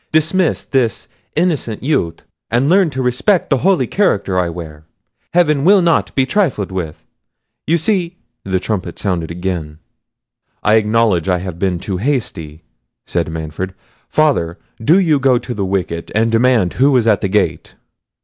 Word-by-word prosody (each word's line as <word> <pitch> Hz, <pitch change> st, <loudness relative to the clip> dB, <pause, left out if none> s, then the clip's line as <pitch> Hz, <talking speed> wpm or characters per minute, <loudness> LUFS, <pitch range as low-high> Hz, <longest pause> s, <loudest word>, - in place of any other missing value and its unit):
Dismiss 160 Hz, +3 st, +1 dB
this 125 Hz, -6 st, 0 dB, 0.3 s
innocent 155 Hz, -, -1 dB
youth; 85 Hz, -, -1 dB, 0.3 s
and 120 Hz, +4 st, +1 dB
learn 185 Hz, +1 st, +4 dB
to 130 Hz, -2 st, -3 dB
respect 135 Hz, -, +1 dB
the 135 Hz, -, +3 dB
holy 180 Hz, -6 st, +2 dB
character 100 Hz, -, +1 dB
I 90 Hz, -1 st, 0 dB
wear. 80 Hz, -3 st, -8 dB, 0.5 s
Heaven 150 Hz, -5 st, +3 dB
will 195 Hz, +2 st, +5 dB
not 170 Hz, -1 st, +1 dB
be 135 Hz, -, +3 dB
trifled 135 Hz, -, 0 dB
with: 85 Hz, -5 st, -5 dB, 0.6 s
you 165 Hz, +3 st, +3 dB
see—" 180 Hz, 0 st, -1 dB, 0.3 s
the 95 Hz, -1 st, -1 dB
trumpet 100 Hz, 0 st, -4 dB
sounded 90 Hz, -5 st, -2 dB
again. 85 Hz, -3 st, -4 dB, 0.9 s
"I 105 Hz, -, +3 dB
acknowledge 110 Hz, -5 st, +2 dB
I 90 Hz, -, +2 dB
have 90 Hz, -1 st, -6 dB
been 95 Hz, -2 st, 0 dB
too 95 Hz, +2 st, -4 dB
hasty," 90 Hz, -, -3 dB, 0.4 s
said 85 Hz, -2 st, -2 dB
Manfred. 80 Hz, +4 st, -5 dB, 0.3 s
"Father, 125 Hz, -, +1 dB, 0.3 s
do 160 Hz, +10 st, +5 dB
you 160 Hz, -7 st, +3 dB
go 130 Hz, -2 st, +3 dB
to 120 Hz, -, -5 dB
the 100 Hz, -3 st, -2 dB
wicket, 90 Hz, -3 st, -3 dB
and 115 Hz, +1 st, +2 dB
demand 115 Hz, -5 st, +2 dB
who 135 Hz, 0 st, +3 dB
is 120 Hz, -, +1 dB
at 105 Hz, -4 st, +3 dB
the -, -, 0 dB
gate." 105 Hz, +2 st, -1 dB
110 Hz, 160 wpm, -17 LUFS, 90-150 Hz, 0.9 s, will